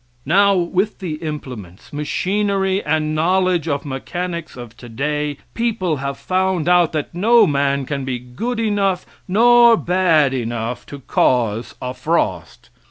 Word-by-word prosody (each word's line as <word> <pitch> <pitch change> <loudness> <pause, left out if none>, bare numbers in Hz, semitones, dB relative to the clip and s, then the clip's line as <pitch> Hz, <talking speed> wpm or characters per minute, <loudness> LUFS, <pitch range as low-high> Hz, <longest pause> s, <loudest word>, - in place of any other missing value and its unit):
Now, 200 +6 +4
with 185 +4 0
the 165 -5 -5
implements, 125 - -8
machinery 195 +5 0
and 155 0 0
knowledge 180 +1 +1
of 145 -2 -2
mechanics 170 +4 -5
of 120 -2 -10
today, 145 +5 -3 0.2
people 210 -9 -1
have 140 0 -4
found 185 -3 0
out 175 -2 +4
that 155 -2 -3
no 225 +7 +5
man 140 -1 0
can 140 0 -3
be 130 -1 -2
good 130 - -5
enough 200 -4 0 0.2
nor 235 +3 +6
bad 170 -7 +2
enough 120 -1 -4
to 140 -1 -9
cause 115 -3 0
a 125 0 -4
frost. 130 - -2
155 Hz, 135 wpm, -19 LUFS, 135-190 Hz, 0.2 s, nor